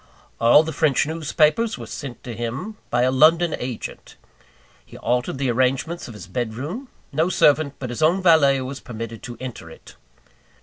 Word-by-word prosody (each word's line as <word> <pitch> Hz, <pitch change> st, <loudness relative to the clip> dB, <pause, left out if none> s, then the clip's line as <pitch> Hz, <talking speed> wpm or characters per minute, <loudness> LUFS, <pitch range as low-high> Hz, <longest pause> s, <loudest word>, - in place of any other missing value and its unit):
All 120 Hz, +6 st, +6 dB
the 160 Hz, 0 st, -5 dB
French 145 Hz, -2 st, +2 dB
newspapers 160 Hz, +7 st, +1 dB
were -, -, -7 dB
sent 135 Hz, -4 st, -8 dB
to 120 Hz, -, -6 dB
him 120 Hz, -, -5 dB
by 120 Hz, 0 st, +2 dB
a 130 Hz, -, +3 dB
London 160 Hz, +5 st, +4 dB
agent. 125 Hz, -2 st, -7 dB, 0.7 s
He -, -, -13 dB
altered 125 Hz, +2 st, -1 dB
the 130 Hz, -2 st, 0 dB
arrangements 130 Hz, +7 st, 0 dB
of 120 Hz, -, -10 dB
his 95 Hz, -4 st, -9 dB
bed 110 Hz, +4 st, -3 dB
room; 175 Hz, -, -5 dB, 0.2 s
no 160 Hz, +5 st, +1 dB
servant 145 Hz, -4 st, +3 dB
but 130 Hz, -3 st, -5 dB
his 120 Hz, -, -5 dB
own 165 Hz, +5 st, +4 dB
valet 155 Hz, -7 st, +5 dB
was 130 Hz, +1 st, -5 dB
permitted 115 Hz, -1 st, -7 dB
to 120 Hz, -1 st, -8 dB
enter 125 Hz, -10 st, -7 dB
it. -, -, -14 dB
135 Hz, 175 wpm, -22 LUFS, 120-160 Hz, 0.7 s, All